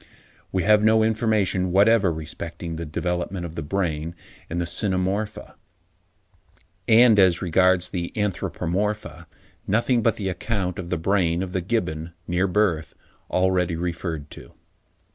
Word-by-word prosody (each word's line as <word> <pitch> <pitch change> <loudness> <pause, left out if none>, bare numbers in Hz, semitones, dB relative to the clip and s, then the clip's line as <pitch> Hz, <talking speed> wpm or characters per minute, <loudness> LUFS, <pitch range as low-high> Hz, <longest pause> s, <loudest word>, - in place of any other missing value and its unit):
We 95 -2 0
have 105 +2 +4
no 110 0 +5
information 105 -5 +1
whatever 100 0 +4
respecting 80 +1 -6
the 85 0 -5
development 90 +3 -3
of 80 - -7
the 80 - -4
brain 80 0 -2 0.3
in 85 - -3
the 85 - 0
Cynomorpha; 95 +3 -2 1.3
and, 115 -1 +6
as 95 -3 +4
regards 90 +1 +3
the 85 -2 -4
Anthropomorpha, 95 -3 -2 0.4
nothing 120 +3 +2
but 115 0 +2
the 95 -3 -3
account 95 0 -3
of 85 -2 -6
the 90 - 0
brain 90 0 +1
of 90 -1 -6
the 95 - 0
Gibbon, 85 -5 -2
near 90 +2 +1
birth, 90 -5 0 0.4
already 90 -2 +1
referred 80 -3 -4
to. - - -12
90 Hz, 135 wpm, -24 LUFS, 85-105 Hz, 1.3 s, and